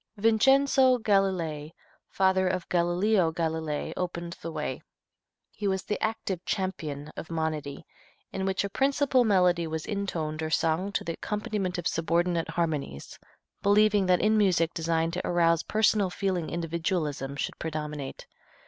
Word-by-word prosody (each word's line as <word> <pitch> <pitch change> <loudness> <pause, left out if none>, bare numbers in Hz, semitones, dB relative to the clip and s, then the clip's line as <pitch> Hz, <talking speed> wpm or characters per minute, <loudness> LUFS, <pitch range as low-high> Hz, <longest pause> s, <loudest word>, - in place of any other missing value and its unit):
Vincenzo 260 +4 +4
Galilei, 185 -8 0 0.4
father 190 -1 +2
of 180 -1 -2
Galileo 175 +1 +2
Galilei, 160 -2 -2
opened 170 -1 -4
the 165 - -5
way. - - -4 0.7
He 210 - -4
was 190 -1 0
the 210 - -3
active 220 -5 -2
champion 155 -7 -3
of - - -7
monody, 155 -4 -3 0.5
in 190 - -3
which 190 0 0
a 200 - -3
principal 270 -1 +2
melody 180 -5 +3
was 160 0 -4
intoned 165 -7 -3
or 160 - -2
sung 165 +4 +1
to - - -1
the 165 - -3
accompaniment 205 -2 -3
of 175 - -5
subordinate 170 +1 0
harmonies, 150 - -3 0.4
believing 205 -1 +4
that 180 -1 +3
in 215 0 +3
music 175 -5 +2
designed 165 0 0
to 180 - -2
arouse 170 -1 +3
personal 215 -2 +2
feeling 180 -3 -2
individualism 165 -4 -2
should - - -4
predominate. 150 -3 -5
175 Hz, 140 wpm, -28 LUFS, 160-200 Hz, 0.7 s, Vincenzo